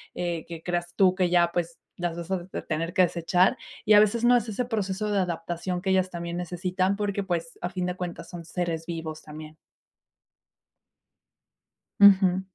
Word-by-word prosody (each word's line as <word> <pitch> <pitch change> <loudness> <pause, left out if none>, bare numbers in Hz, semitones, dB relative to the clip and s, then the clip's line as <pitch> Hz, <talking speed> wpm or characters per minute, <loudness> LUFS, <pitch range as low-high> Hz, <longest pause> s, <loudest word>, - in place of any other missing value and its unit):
eh, 170 -2 -3
que 165 -1 -8
creas 175 -1 -3
tú 185 -2 +5
que 185 -1 +1
ya, 170 -1 +3
pues, 170 -1 -2 0.2
las 175 -1 -3
vas 170 +2 -7
a 180 -2 -2 0.2
tener 165 +2 -2
que 185 -2 +5
desechar 175 +1 +2 0.3
y 215 - +5
a 205 - +9
veces 215 +2 +3
no, 245 +1 +6
es 230 -1 -3
ese 230 +4 -2
proceso 210 -2 -2
de 200 - +2
adaptación 175 0 -3
que 190 - -2
ellas 185 -1 +2
también 170 -1 -5
necesitan 185 +2 -1
porque 200 -1 -2
pues, 170 -3 -3
a 175 - -2
fin 180 -1 -3
de 180 0 -2
cuentas, 180 -2 -6
son 170 -2 -8
seres 165 -2 -3
vivos 160 -2 -5
también. 155 0 -10 2.4
Ujú. 190 -2 +6
180 Hz, 175 wpm, -26 LUFS, 170-190 Hz, 2.4 s, a